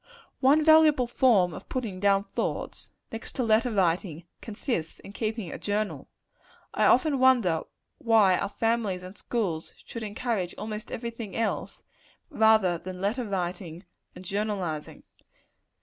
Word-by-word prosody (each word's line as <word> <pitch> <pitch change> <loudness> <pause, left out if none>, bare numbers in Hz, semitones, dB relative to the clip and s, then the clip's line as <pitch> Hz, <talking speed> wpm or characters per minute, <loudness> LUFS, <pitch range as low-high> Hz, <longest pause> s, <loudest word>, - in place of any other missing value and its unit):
One 290 +3 +4
valuable 315 -4 +6
form 230 -8 +3
of - - -10
putting 225 -8 -4
down 200 0 +3
thoughts - - -4 0.2
next 225 - -7
to 255 - -1
letter 225 +2 +3
writing 175 -5 0 0.2
consists 205 - -4
in 200 - -12
keeping 220 -4 -3
a - - -7
journal. 210 +1 -3 0.6
I - - +2
often 300 -5 +3
wonder 240 -11 +4 0.4
why 220 -8 +4
our 200 - -2
families 220 -4 -1
and 185 +2 -10
schools 190 -11 -3
should 230 - -7
encourage 210 -3 -3
almost 215 0 -6
every 235 0 -4
thing 230 -4 -8
else, 230 - -3 0.5
rather 220 - +4
than 185 +1 -8
letter 220 +6 -1
writing 180 -2 -4 0.3
and 180 +1 -11
journalizing. 195 -6 -3
210 Hz, 135 wpm, -27 LUFS, 185-235 Hz, 0.6 s, valuable